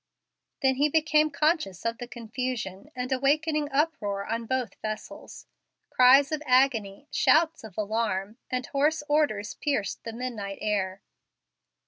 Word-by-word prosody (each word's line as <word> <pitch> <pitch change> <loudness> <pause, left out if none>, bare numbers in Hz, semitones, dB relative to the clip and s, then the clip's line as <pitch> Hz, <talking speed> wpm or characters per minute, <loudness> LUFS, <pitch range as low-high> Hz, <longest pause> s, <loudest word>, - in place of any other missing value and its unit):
Then 265 -1 +3
he 295 +2 +3
became 310 0 +3
conscious 300 - 0
of 230 0 -1
the 245 - -6
confusion, 240 -2 -5
and 250 +1 -4
awakening 295 +3 +1
uproar 270 -10 0
on 230 0 -3
both 255 -5 -1
vessels. 215 0 -7 0.5
Cries 270 +3 +6
of 310 -1 -2
agony, 255 -2 +2
shouts 320 -2 +3
of 215 -5 -11
alarm, 215 0 -2
and 255 0 -2
hoarse 295 +2 +1
orders 290 -9 +1
pierced 275 -9 -2
the 230 - -5
midnight 225 -5 -5
air. 200 -3 -2
250 Hz, 130 wpm, -27 LUFS, 215-290 Hz, 0.5 s, Cries